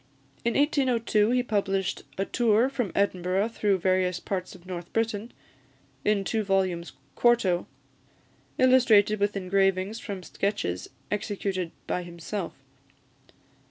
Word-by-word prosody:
In 235 - 0
1802 250 -7 +2
he 250 +1 +2
published 195 -4 -1 0.2
"A 195 - 0
Tour 235 +2 +3
from 245 -8 -2
Edinburgh 190 +1 +1
through 205 -4 +1
various 185 0 +1
parts 185 -1 -4
of 175 -1 -16
North 175 -2 -7
Britain," 225 0 -1 0.7
in 210 -2 +2
two 220 +3 0
volumes 190 -3 0 0.2
quarto, 220 -8 +3 0.9
illustrated 225 -5 +5
with 205 0 +1
engravings 195 +2 +1
from 195 -4 -6
sketches 130 - -2 0.2
executed 195 -3 -2 0.2
by 180 - -1
himself. 175 +2 -5
200 Hz, 115 wpm, -27 LUFS, 185-225 Hz, 0.9 s, illustrated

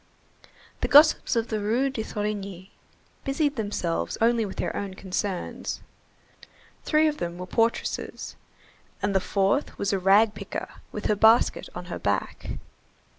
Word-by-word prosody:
The - - 0
gossips 300 -2 +6
of 230 0 0
the 215 - -1
Rue 235 +7 +1
de 240 - -3
Thorigny 200 -3 -4 0.5
busied 285 +1 0
themselves 205 -7 -2
only 230 -1 +3
with 190 - -8
their - - -2
own 195 -2 -4
concerns. 190 -1 -3 1.0
Three 310 0 +3
of 300 -1 -1
them 170 0 -4
were 180 - -5
portresses, 230 +4 -1 0.7
and 205 -1 +1
the 190 - +4
fourth 195 +7 0
was 200 - -1
a 195 - +1
rag 205 +4 +5
picker 200 -2 -6 0.2
with 210 - -6
her 210 - +3
basket 220 +3 +4
on - - -6
her - - -6
back. - - -2
210 Hz, 145 wpm, -26 LUFS, 195-235 Hz, 1.0 s, gossips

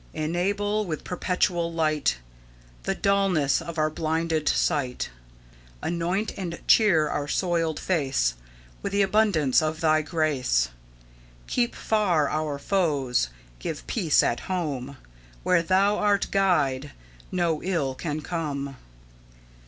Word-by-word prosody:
"Enable 200 +7 0
with 155 -3 -4
perpetual 175 -1 0
light 155 - +1 0.7
The - - 0
dulness 195 -8 +2
of 170 -1 -7
our 155 0 +1
blinded 160 0 0
sight; 130 - 0 0.7
Anoint 175 +5 -1
and 170 -3 -4
cheer 170 -9 +5
our 145 0 -2
soiled 165 -1 0
face 135 - +1 0.5
With 200 - -4
the 200 0 +4
abundance 195 - +3
of 155 0 -2
Thy 155 -2 +3
grace; 145 - +1 0.8
Keep 240 -1 0
far 185 -9 +2
our 155 -2 -1
foes; 140 - +1 0.3
give 155 - -5
peace 175 -10 +2
at 120 - +1
home; 140 -7 -3 0.5
Where 180 -2 +3
Thou 195 +4 +2
art 205 -1 +2
Guide, 150 -8 +1 0.4
no 170 -4 0
ill 165 -8 -1
can 150 +3 -4
come." 140 -5 -4
160 Hz, 115 wpm, -26 LUFS, 145-185 Hz, 0.8 s, cheer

